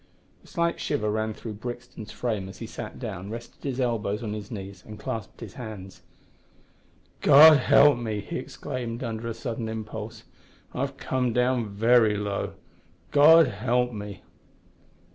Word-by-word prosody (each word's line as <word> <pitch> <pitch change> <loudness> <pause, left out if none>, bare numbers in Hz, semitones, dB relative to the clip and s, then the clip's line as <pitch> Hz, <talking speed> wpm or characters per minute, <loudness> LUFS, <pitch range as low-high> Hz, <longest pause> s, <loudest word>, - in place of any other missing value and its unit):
A - - -19
slight 170 -1 -1
shiver 105 -8 -1
ran 110 0 -2
through 110 - -7
Brixton's 120 -3 -7
frame 105 -6 -3
as 95 - -11
he 115 - -6
sat 110 0 -7
down, 100 -6 -6
rested 115 +2 -9
his 135 -2 -3
elbows 115 -3 -1
on 105 -2 -3
his 105 -1 -6
knees, 100 -4 -8
and 105 -1 -10
clasped 115 0 -6
his - - -8
hands. 105 -6 -9 1.2
"God 150 +1 +9
help 140 0 +5
me!" 110 -3 -3
he 170 - -5
exclaimed, 125 -3 -5
under 115 -1 -4
a 115 - -2
sudden 115 -3 -4
impulse, 110 -1 -6 0.5
"I've 135 +1 -3
come 125 -3 -1
down 125 -2 +1
very 110 +1 +4
low, 100 -1 -3 0.6
God 160 +3 +8
help 125 0 0
me!" 105 -2 -7
115 Hz, 150 wpm, -26 LUFS, 105-125 Hz, 1.2 s, God